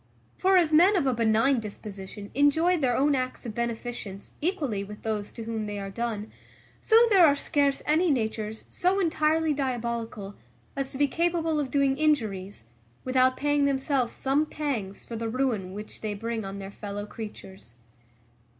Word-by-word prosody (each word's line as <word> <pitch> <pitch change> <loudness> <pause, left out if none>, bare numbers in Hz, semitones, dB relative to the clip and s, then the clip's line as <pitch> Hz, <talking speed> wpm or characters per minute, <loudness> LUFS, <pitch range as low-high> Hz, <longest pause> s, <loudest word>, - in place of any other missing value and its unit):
For 380 0 +4
as 325 -3 +3
men 360 +7 +6
of 345 -7 +2
a 260 - +2
benign 230 +3 +3
disposition 205 -1 -8
enjoy 305 +6 +3
their 250 -4 +1
own 285 +2 +3
acts 255 -1 -2
of 225 - -4
beneficence 235 -3 -4
equally 290 - -1
with 210 +1 -10
those 215 -2 -2
to 230 - -7
whom 220 -1 -3
they 205 0 -4
are 195 -1 -5
done, 220 -1 -3 0.5
so 445 - +4
there 385 -3 +7
are 290 -3 +6
scarce 285 -1 0
any 325 +4 +3
natures 220 -4 -2
so 370 +2 +1
entirely 320 -2 +2
diabolical, 235 -6 -3 0.4
as 275 -1 -3
to - - -7
be 285 +1 +3
capable 330 0 0
of 280 -3 -2
doing 275 -1 +1
injuries, 210 - 0 0.4
without 255 0 +3
paying 290 0 +2
themselves 270 -2 0
some 280 +3 +1
pangs 240 -12 -3
for 230 - -7
the 225 0 -3
ruin 230 -7 -1
which 210 +2 -8
they 210 -1 -3
bring 225 0 -3
on 195 +1 -6
their 195 0 -7
fellow 205 0 -6
creatures. 195 - -10
250 Hz, 170 wpm, -27 LUFS, 215-290 Hz, 0.5 s, there